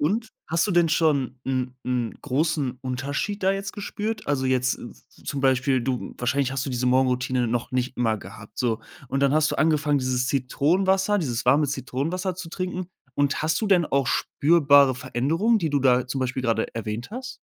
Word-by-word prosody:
O 145 - +2
und 220 +6 -1 0.2
hast 165 +4 +1
du - - -1
denn 175 -1 +4
schon 145 -6 +1
'n 130 -1 -2
'n 125 -2 -1
großen 140 -2 -1
Unterschied 140 +11 -3
da 190 +1 +3
jetzt 195 0 -4
gespürt? 210 +2 -4
Also, 130 -2 0
jetzt 130 -1 +2
z - - -8
z - - -23
zum 140 - -3
Beispiel 130 0 +2
du 125 0 -3
wahrscheinlich 130 +2 0
hast 135 -1 -2
du 140 - -4
diese 125 0 -1
Morgenroutine 125 -1 +2
noch 120 +1 -2
nicht 130 0 -2
immer 115 -3 +2
gehabt, 100 +1 -12
so 115 -3 0 0.3
und 135 - -1
dann 140 0 +3
hast 155 0 +3
du - - -2
angefangen, 150 -2 +2
dieses 130 -1 0
Zitronenwasser, 190 +10 +1
dieses 125 - -2
warme 145 +4 +4
Zitronenwasser 145 +8 -2
zu 180 -1 -7
trinken 185 +1 -4 0.3
und 145 +2 +1
hast 155 0 +1
du 220 - -1
denn 185 -4 +4
auch 140 -3 0
spürbare 140 -2 +4
Veränderungen, 165 - +1
die 165 -5 -1
du 145 -1 +1
da 125 -1 +3
zum 130 +2 -3
Beispiel 130 0 -2
gerade 115 -2 -1
erwähnt 115 - -4
hast? 255 +3 -7
140 Hz, 195 wpm, -24 LUFS, 125-165 Hz, 0.3 s, denn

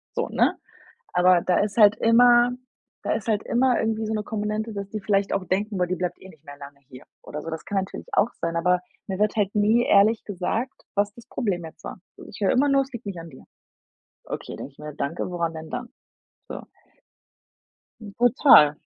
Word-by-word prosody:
so, - - -1
ne? - - +2 0.6
Aber 180 0 +4
da 180 - +1
ist 205 +1 -2
halt 210 -2 +7
immer 240 +1 +5 0.5
da - - 0
ist 220 - -4
halt 215 -2 +1
immer 250 0 +2
irgendwie 220 0 -1
so 220 - -2
'ne 215 - -1
Komponente, 215 +1 -3
dass 200 -1 -5
die 215 0 -5
vielleicht 195 0 0
auch 195 -1 -1
denken: 205 +4 -1
„Boah, 180 -1 +1
die 185 - -1
bleibt 180 -1 -4
eh 190 - -12
nicht 160 -4 -19
mehr 145 0 -11
lange 140 0 -12
hier“ 125 -1 -12 0.2
oder 150 - -7
so. 165 - -7
Das 160 -1 -6
kann 200 - -1
natürlich 190 0 -6
auch 225 - +3
sein, 170 0 -2
aber 180 +2 +2 0.3
mir 190 - -3
wird 210 +1 +1
halt 205 -2 0
nie 215 +3 +3
ehrlich 210 +3 +4
gesagt, 210 +7 -3
was 205 0 +1
das 235 - -15
Problem 190 -9 -2
jetzt 160 - -13
war. - - -8 0.2
So - - -12
ich - - -11
höre 195 - +3
immer 280 +3 +3
nur: 275 0 +4
„Es 270 - -15
liegt 235 -2 -8
nicht 190 -4 -5
an 165 0 -9
dir.“ 130 - -15 0.8
„Okay“, - - -6
denke 140 - -8
ich - - -34
mir: 150 0 -8
„Danke, 140 +4 -3
woran 170 -2 -2
denn 160 0 -8
dann?“ 245 -1 -5 0.6
So. - - -7 1.4
Hm, 210 -2 -9
total. 245 - +6
200 Hz, 215 wpm, -24 LUFS, 175-225 Hz, 1.4 s, halt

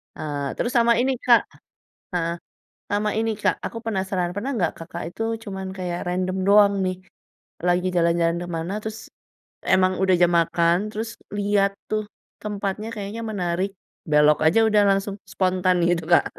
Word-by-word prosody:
Eee, 145 -3 -4
terus 240 - -1
sama 235 0 +5
ini 265 +1 +1
Kak. 240 -2 +5 0.7
Heeh, 170 -1 -1 0.5
sama 210 +1 0
ini 225 +1 0
Kak - - +1
aku 230 - -5
penasaran 190 -4 -1
pernah 235 +8 -3
nggak 175 -5 0
Kakak 170 +1 -7
itu - - -8 0.2
cuman 190 -1 -5
kayak 175 -1 -3
random 185 +1 -1
doang 200 0 +6
nih, 185 0 -2 0.7
lagi 180 +1 +2
jalan-jalan 170 0 +2
kemana 170 +2 -4
terus, 220 +1 -6 0.7
emang 185 0 +3
udah 190 -1 +4
jam 175 0 +4
makan 170 +1 +2
terus 225 +2 -4 0.3
liat 200 -1 +2 0.2
tuh 215 0 0 0.4
tempatnya 210 +1 -3
kayaknya 210 +2 -5
menarik, 190 -2 -1 0.4
belok 150 0 +5
aja 200 +8 +5
udah 210 -1 +4
langsung 195 0 0
spontan 185 -1 +1
gitu, 170 -2 +1
Kak. - - +6
190 Hz, 150 wpm, -23 LUFS, 175-210 Hz, 0.7 s, doang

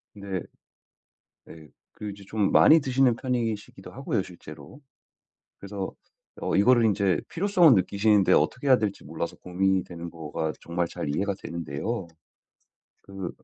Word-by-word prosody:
네. 100 -3 -4 1.0
네 80 -2 -13 0.2
그리고 105 -1 -7
이제 100 0 -14
좀 105 0 0
많이 160 - +7
드시는 130 -3 +2
편이시기도 115 -5 -4
하고요 - - -2
실제로. 75 - -12 0.8
그래서 100 -1 -6 0.5
어 - - -2
이거를 120 +4 +5
인제 100 -4 +2
필요성을 175 -4 +4
느끼시는데 100 +1 +3
어떻게 130 - +1
해야 130 - +7
될지 105 -2 -3
몰라서 80 +3 -5
고민이 95 +1 0
되는 85 -1 -8
거가 80 -1 -4
정말 85 +1 -2
잘 - - -5
이해가 100 +8 -1
되는데요. 85 +6 -4 1.0
그 95 -2 -6
100 Hz, 315 characters per minute, -26 LUFS, 85-115 Hz, 1.0 s, 많이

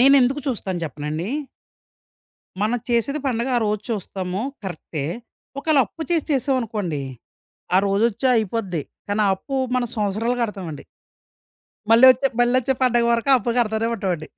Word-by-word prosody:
నేనెందుకు 270 +1 +5
చూస్తాను 200 -8 -2
జెప్పనాండి. 150 +4 -4 1.3
మనం 230 +3 +1
చేసేది 245 +5 +1
పండగ 240 -1 0
ఆరోజు 215 -2 0
చూస్తాము 190 -3 -3 0.2
కరెక్టే. 160 -5 -5 0.5
ఒకేళ 300 +1 +3
అప్పు 325 - -8
చేసి 330 -3 +1
చేసావనుకోండి, 230 - -1 0.7
ఆ - - +7
రోజొచ్చి 220 +5 +1
అయిపోద్ది. 205 -6 -1 0.3
కానీ, 205 +1 0
ఆ - - +3
అప్పు 270 +8 -5 0.2
మనం 245 -1 0
సంవత్సరాలు 215 +3 0
గడతామండి. 185 -9 -5 1.1
మళ్లొచ్చే 255 +3 +7
మళ్లొచ్చే 255 +2 +3
పండగ 240 -2 +3
వరకు 235 +4 +1
అప్పు 235 +2 -2
గడతనే 220 -1 +1
ఉంటావండి. 185 -7 -3
225 Hz, 120 wpm, -22 LUFS, 190-250 Hz, 1.3 s, ఆ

